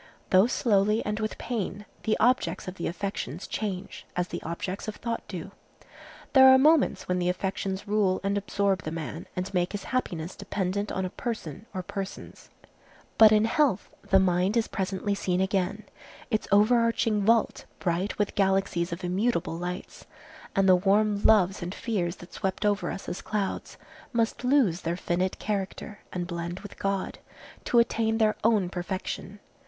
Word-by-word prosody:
Though 190 +4 +6
slowly 210 -3 +2
and 210 +1 -2
with 215 0 -3
pain, 210 -3 -4 0.2
the 215 - +2
objects 245 -3 +2
of 185 - -4
the 175 - -4
affections 180 -3 -4
change, 200 -3 -5
as 180 0 -1
the - - -5
objects 180 +5 -4
of 215 - -4
thought 230 -1 -3
do. 185 0 -6 0.8
There 265 -1 +9
are 260 0 +9
moments 300 +2 +3
when 180 0 0
the 175 0 +1
affections 190 +1 -3
rule 200 -3 +2
and 200 +1 0
absorb 200 -2 0
the 155 - -4
man 160 0 -6
and 185 +2 -4
make 180 +1 0
his 205 - -4
happiness 175 -9 -3
dependent 200 +1 -2
on 190 - -1
a 180 - -4
person 215 - -5
or 185 -2 -4
persons. 195 +1 -7 0.7
But 220 -1 +9
in 215 0 +5
health 255 - +1
the 190 - +3
mind 185 +3 +2
is 225 - +2
presently 195 +1 -2
seen 185 -2 -1
again,—its 200 +3 -3
overarching 225 0 +3
vault, 230 +2 +2
bright 180 +3 -1
with 205 -1 0
galaxies 195 -3 +1
of 170 +2 -5
immutable 185 0 0
lights, 180 +2 -6 0.5
and 195 0 +3
the 185 - +8
warm 205 +2 +2
loves 195 -2 +4
and 175 +2 -4
fears 185 -7 -2
that 175 - -14
swept 190 +2 -2
over 205 0 +1
us - - -6
as 175 - -4
clouds 205 -3 -3 0.4
must 230 +1 0
lose 250 - +3
their 170 +1 -2
finite 180 +1 -1
character 205 0 -4
and 180 -1 -3
blend 170 +1 -5
with 205 - -11
God, 195 -1 -2 0.5
to 240 - +2
attain 225 -1 +3
their 215 -1 +3
own 215 -4 +3
perfection. 185 +2 -5
195 Hz, 165 wpm, -27 LUFS, 180-215 Hz, 0.8 s, There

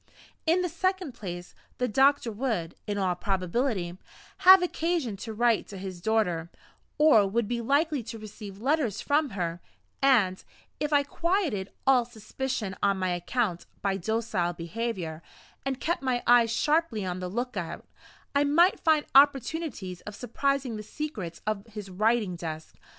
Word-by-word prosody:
In 350 +3 +3
the - - +1
second 370 -1 -1
place, 180 -6 -7 0.2
the 250 - 0
doctor 270 +1 +3
would, 210 -8 -2
in 205 -1 -2
all 190 -2 +1
probability, 185 0 -1 0.4
have 375 0 +8
occasion 330 - -1
to 225 +3 -6
write 230 +1 +2
to 200 - -9
his 185 -2 -7
daughter, 180 -6 0 0.5
or 300 -10 +6
would 220 +2 0
be 240 +1 -2
likely 285 +3 +1
to 225 - -6
receive 210 -2 -9
letters 255 - 0
from 290 +3 +1
her; 170 -1 -2 0.4
and, 220 -9 +3 0.4
if 300 0 -1
I 290 -1 +4
quieted 315 - -1 0.2
all 265 -2 +5
suspicion 230 -2 -4
on 200 -1 +2
my 185 -1 0
account, 180 +2 -1 0.2
by 195 -1 +1
docile 195 -3 -1
behavior, 170 -2 -4 0.5
and 265 -1 -2
kept 340 -3 -1
my 255 -2 0
eyes 240 -1 +5
sharply 295 - +1
on 180 0 -3
the 180 -1 -4
lookout, 205 -6 -4 0.5
I 285 0 +3
might 335 +6 +4
find 315 -2 +3
opportunities 275 - +2
of 210 - -8
surprising 260 0 -1
the - - -5
secrets 215 - -6
of 215 0 -2
his 210 -3 -8
writing 215 -1 +1
desk. 160 -2 -6
225 Hz, 150 wpm, -28 LUFS, 190-275 Hz, 0.5 s, have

